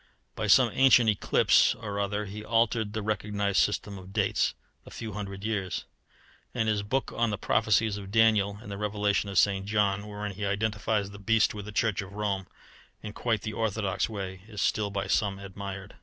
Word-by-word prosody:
By -, -, -2 dB
some -, -, +6 dB
ancient 125 Hz, -4 st, +6 dB
eclipse 100 Hz, -, +3 dB
or 105 Hz, -3 st, -5 dB
other 105 Hz, +1 st, -1 dB
he 105 Hz, +2 st, -7 dB
altered 115 Hz, -1 st, +1 dB
the 110 Hz, -1 st, -3 dB
recognized 105 Hz, -2 st, 0 dB
system 100 Hz, +7 st, 0 dB
of 95 Hz, +1 st, -12 dB
dates 100 Hz, -1 st, +1 dB, 0.3 s
a -, -, -13 dB
few 110 Hz, -2 st, -7 dB
hundred 100 Hz, -1 st, -6 dB
years; 105 Hz, -4 st, -2 dB, 0.7 s
and 110 Hz, -, 0 dB
his 105 Hz, -2 st, +1 dB
book 130 Hz, +7 st, -2 dB
on 115 Hz, -1 st, +1 dB
the 105 Hz, -, -2 dB
prophecies 105 Hz, +1 st, +2 dB
of 100 Hz, -1 st, -8 dB
Daniel 105 Hz, -2 st, +3 dB
and 105 Hz, -, -9 dB
the 100 Hz, -, -5 dB
Revelation 105 Hz, -1 st, 0 dB
of 100 Hz, -, -3 dB
St. 95 Hz, 0 st, +3 dB
John, 105 Hz, -1 st, +1 dB
wherein 105 Hz, 0 st, -5 dB
he 100 Hz, +2 st, -7 dB
identifies 105 Hz, 0 st, -1 dB
the 100 Hz, -, -11 dB
beast 110 Hz, +2 st, +2 dB
with 105 Hz, -1 st, -7 dB
the 105 Hz, -, -7 dB
Church 105 Hz, -2 st, 0 dB
of 95 Hz, 0 st, -10 dB
Rome 100 Hz, -2 st, -2 dB, 0.6 s
in 105 Hz, -1 st, -6 dB
quite 115 Hz, -3 st, -1 dB
the 110 Hz, -, -4 dB
orthodox 110 Hz, -3 st, -1 dB
way, 95 Hz, -3 st, -6 dB
is 105 Hz, -2 st, -8 dB
still 105 Hz, 0 st, +1 dB
by 100 Hz, -1 st, -3 dB
some 100 Hz, -3 st, +1 dB
admired. 100 Hz, 0 st, -7 dB
105 Hz, 190 wpm, -28 LUFS, 100-110 Hz, 0.7 s, some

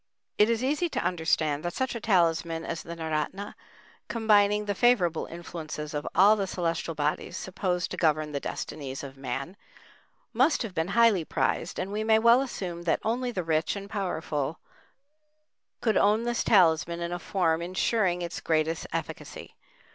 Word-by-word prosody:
It 210 Hz, +2 st, +6 dB
is 230 Hz, +1 st, 0 dB
easy 300 Hz, +6 st, +1 dB
to -, -, -2 dB
understand 160 Hz, -4 st, 0 dB
that 175 Hz, 0 st, -3 dB
such 260 Hz, -1 st, -1 dB
a 235 Hz, -, -4 dB
talisman 170 Hz, -5 st, +1 dB
as 165 Hz, -, -4 dB
the 170 Hz, -, -8 dB
naoratna, 160 Hz, +5 st, -3 dB, 0.5 s
combining 210 Hz, -2 st, +3 dB
the 205 Hz, -, -1 dB
favorable 190 Hz, -7 st, +2 dB
influences 160 Hz, -3 st, -7 dB
of 150 Hz, 0 st, -3 dB
all 205 Hz, +3 st, +7 dB
the 200 Hz, -2 st, -2 dB
celestial 170 Hz, -2 st, -2 dB
bodies 150 Hz, 0 st, -2 dB
supposed 180 Hz, -1 st, -2 dB
to -, -, -4 dB
govern 155 Hz, -2 st, +1 dB
the 140 Hz, -, -2 dB
destinies 140 Hz, -2 st, -5 dB
of 135 Hz, -1 st, -8 dB
man, 135 Hz, +6 st, -5 dB, 0.8 s
must 315 Hz, -, +3 dB
have 215 Hz, -5 st, -6 dB
been 160 Hz, -1 st, -1 dB
highly 230 Hz, -7 st, +5 dB
prized, 145 Hz, +3 st, -1 dB
and 185 Hz, +2 st, -3 dB
we 210 Hz, +1 st, -2 dB
may 220 Hz, 0 st, +4 dB
well 235 Hz, +3 st, +5 dB
assume 180 Hz, -10 st, -5 dB
that 175 Hz, -, +1 dB
only 245 Hz, +3 st, -1 dB
the 185 Hz, -6 st, -3 dB
rich 160 Hz, +2 st, 0 dB
and 200 Hz, 0 st, -8 dB
powerful 160 Hz, -7 st, -2 dB, 1.2 s
could 220 Hz, -2 st, +2 dB
own 210 Hz, +3 st, +3 dB
this 240 Hz, 0 st, 0 dB
talisman 170 Hz, -3 st, +3 dB
in 170 Hz, 0 st, -3 dB
a 175 Hz, -, -3 dB
form 170 Hz, -4 st, 0 dB
ensuring 180 Hz, 0 st, 0 dB
its 170 Hz, -, -5 dB
greatest 160 Hz, 0 st, 0 dB
efficacy. -, -, -6 dB
175 Hz, 165 wpm, -27 LUFS, 160-210 Hz, 1.2 s, all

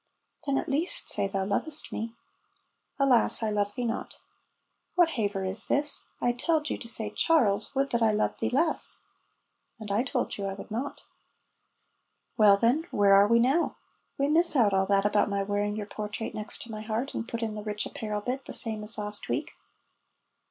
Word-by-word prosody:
"Then 275 Hz, -1 st, +1 dB
at -, -, -2 dB
least 300 Hz, +5 st, +2 dB
say 200 Hz, -, +1 dB
thou 195 Hz, -1 st, -2 dB
lovest 295 Hz, +10 st, -1 dB
me." 230 Hz, +1 st, -5 dB, 0.8 s
"Alas, 260 Hz, -5 st, +3 dB
I 215 Hz, -, 0 dB
love 205 Hz, -1 st, -1 dB
thee 245 Hz, -1 st, -2 dB
not." 230 Hz, 0 st, -4 dB, 0.8 s
("What 350 Hz, -2 st, +5 dB
haver 205 Hz, -7 st, -2 dB
is 190 Hz, +3 st, -1 dB
this? 290 Hz, 0 st, +2 dB
I 245 Hz, -, +2 dB
telled 305 Hz, +5 st, 0 dB
you -, -, -2 dB
to -, -, -9 dB
say 220 Hz, -2 st, -1 dB
'Charles, 215 Hz, -7 st, +2 dB
would 275 Hz, +1 st, 0 dB
that 235 Hz, -, 0 dB
I 220 Hz, -1 st, +4 dB
loved 210 Hz, 0 st, -1 dB
thee -, -, 0 dB
less.'") 310 Hz, +5 st, +1 dB, 0.8 s
("And 210 Hz, -2 st, -6 dB
I 205 Hz, +3 st, +2 dB
told 250 Hz, -4 st, -2 dB
you 200 Hz, -, -3 dB
I 195 Hz, 0 st, -3 dB
would 200 Hz, -, -11 dB
not.") 250 Hz, +6 st, -4 dB, 1.3 s
("Well, 205 Hz, -3 st, +6 dB
then, 235 Hz, +7 st, +3 dB
where 200 Hz, -1 st, +4 dB
are 200 Hz, +1 st, +7 dB
we 230 Hz, +2 st, +4 dB
now?") 265 Hz, +8 st, +2 dB, 0.4 s
("We 280 Hz, -, +1 dB
miss 330 Hz, +2 st, +5 dB
out 220 Hz, -7 st, +4 dB
all 190 Hz, 0 st, +2 dB
that 200 Hz, 0 st, +2 dB
about 205 Hz, 0 st, +2 dB
my 200 Hz, -1 st, -1 dB
wearing 205 Hz, +1 st, -1 dB
your 210 Hz, -1 st, -4 dB
portrait 210 Hz, +1 st, -5 dB
next 215 Hz, +2 st, -5 dB
my 215 Hz, -2 st, -7 dB
heart, 225 Hz, +5 st, -3 dB
and 225 Hz, -, -4 dB
put 230 Hz, -1 st, -4 dB
in 220 Hz, -1 st, -2 dB
the 210 Hz, -, -6 dB
rich 210 Hz, 0 st, -3 dB
apparel 210 Hz, -1 st, -4 dB
bit, 255 Hz, +4 st, -4 dB
the -, -, -7 dB
same 220 Hz, -2 st, 0 dB
as 210 Hz, +1 st, 0 dB
last 210 Hz, 0 st, -4 dB
week.") -, -, -2 dB
220 Hz, 195 wpm, -28 LUFS, 205-260 Hz, 1.3 s, are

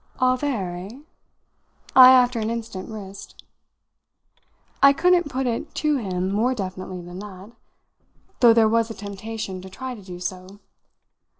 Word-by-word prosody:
"All 255 Hz, 0 st, +3 dB
there, 235 Hz, -10 st, -3 dB
eh?" 205 Hz, +10 st, -10 dB, 0.9 s
I 255 Hz, -1 st, +10 dB
after 250 Hz, -2 st, +4 dB
an 220 Hz, 0 st, -2 dB
instant 225 Hz, -5 st, -6 dB
risked. 200 Hz, -3 st, -10 dB, 1.4 s
I 275 Hz, 0 st, +7 dB
couldn't 350 Hz, +1 st, +2 dB
put 265 Hz, 0 st, -2 dB
it 235 Hz, -2 st, -3 dB
to 300 Hz, -2 st, +1 dB
him 190 Hz, -5 st, -3 dB
more 235 Hz, +6 st, +1 dB
definitely 185 Hz, -3 st, -6 dB
than 175 Hz, +1 st, -9 dB
that, 200 Hz, +1 st, -10 dB, 0.9 s
though 240 Hz, -2 st, +7 dB
there 225 Hz, -1 st, +4 dB
was 230 Hz, +1 st, +1 dB
a 225 Hz, -, -7 dB
temptation 200 Hz, -1 st, -6 dB
to 190 Hz, -, -10 dB
try 260 Hz, +6 st, -7 dB
to 220 Hz, -, -11 dB
do 180 Hz, -2 st, -10 dB
so. 185 Hz, +2 st, -6 dB
220 Hz, 145 wpm, -23 LUFS, 190-255 Hz, 1.4 s, I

